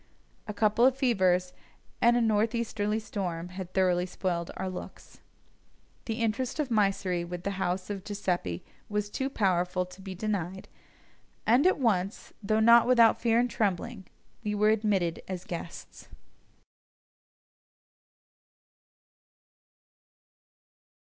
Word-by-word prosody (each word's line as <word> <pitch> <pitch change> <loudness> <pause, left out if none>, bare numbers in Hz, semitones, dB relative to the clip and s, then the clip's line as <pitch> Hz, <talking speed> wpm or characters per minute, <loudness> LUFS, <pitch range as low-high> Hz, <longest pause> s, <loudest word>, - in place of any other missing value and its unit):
A 210 - -4
couple 215 +2 +2
of 260 +1 +5
fevers 185 -8 +2 0.5
and 240 +1 +5
a - - +2
north 220 +1 +2
easterly 215 -2 -1
storm 180 -6 -4
had 185 -1 -7
thoroughly 180 -1 +2
spoiled 175 -2 -2
our 190 - -3
looks. 185 -1 -9 0.9
The 225 0 -3
interest 235 +6 -1
of 295 -4 0
Mysseri 195 -5 +1
with 175 0 -6
the 200 - -1
house 185 +2 -1
of 195 -2 -5
Giuseppini 180 - -2 0.3
was 210 0 -2
too 265 +4 -2
powerful 180 -5 +1
to 185 +2 -14
be 190 -1 -7
denied, 190 -2 -3 0.8
and 250 +9 +5
at 375 - +3
once, 205 -7 -1
though 215 +1 +1
not 235 +1 +6
without 235 -3 +5
fear 230 -1 +3
and 245 - +2
trembling, 210 -1 -2 0.4
we 210 -1 -1
were 210 +1 +3
admitted 205 -6 +1
as 185 -1 -5
guests. 165 - -8
205 Hz, 120 wpm, -29 LUFS, 180-225 Hz, 0.9 s, not